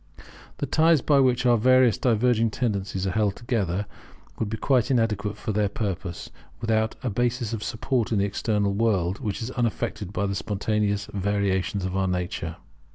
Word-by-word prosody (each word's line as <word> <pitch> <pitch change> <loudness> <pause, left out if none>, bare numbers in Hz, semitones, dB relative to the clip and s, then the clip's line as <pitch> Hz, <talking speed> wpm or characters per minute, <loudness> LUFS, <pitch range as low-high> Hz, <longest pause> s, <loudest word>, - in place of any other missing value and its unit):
The - - -2
ties 160 0 +4
by 145 -2 +4
which 125 -2 +3
our 120 -1 +5
various 130 0 +5
diverging 115 -1 +2
tendencies 100 -5 -2
are 95 - 0
held 105 0 +1
together 105 -5 -1 0.5
would 110 - -1
be 110 - -3
quite 125 -3 +2
inadequate 105 -5 0
for 105 - -3
their 105 -1 +1
purpose, 95 -4 -4 0.3
without 110 -1 0
a 125 - -1
basis 120 +1 -1
of 110 -2 -3
support 120 0 -1
in 110 - +2
the 100 - +2
external 100 0 0
world, 100 -4 +1
which 110 -2 -3
is 120 - -4
unaffected 115 -5 -2
by 100 0 -1
the 100 - -1
spontaneous 105 +1 -1
variations 100 -1 0
of 95 0 -3
our 95 0 +1
nature. 90 -2 -3
105 Hz, 170 wpm, -25 LUFS, 100-120 Hz, 0.5 s, our